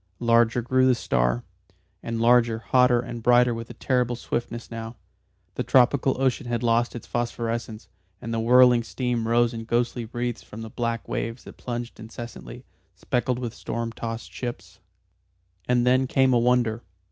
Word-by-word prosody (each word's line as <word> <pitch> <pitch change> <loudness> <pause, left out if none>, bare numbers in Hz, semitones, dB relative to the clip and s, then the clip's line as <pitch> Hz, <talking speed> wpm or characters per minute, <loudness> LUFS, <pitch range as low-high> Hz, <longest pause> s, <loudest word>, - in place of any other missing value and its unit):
Larger 115 0 +3
grew 130 +2 +3
the 130 - +4
star, - - 0 0.6
and 115 0 -4
larger, 115 -1 +4
hotter, 125 +1 +3
and 120 -1 -7
brighter 120 +1 +4
with 115 0 -6
a - - -9
terrible 125 -2 0
swiftness 120 0 -5
now. 115 0 -6 0.6
The - - -2
tropical 130 +1 +3
ocean 135 0 0
had 120 0 -2
lost 120 +1 +1
its 120 - -7
phosphorescence, 115 -2 -3 0.3
and 115 - -5
the 115 - 0
whirling 125 +1 +6
steam 120 -1 -2
rose 120 0 +2
in 115 -1 -6
ghostly 120 0 -1
wreaths 120 +1 -4
from 110 +2 -10
the 110 - -8
black 115 -1 -3
waves 115 +1 -4
that - - -12
plunged 120 -2 -6
incessantly, 110 - -9 0.3
speckled 125 0 -1
with 120 -2 -4
storm 115 0 -4
tossed 115 -1 -6
ships. 95 -6 -7 0.9
And 125 -1 +2
then 130 +1 +3
came 130 0 +3
a 120 - +4
wonder. 120 -2 +2
120 Hz, 160 wpm, -25 LUFS, 115-125 Hz, 0.9 s, whirling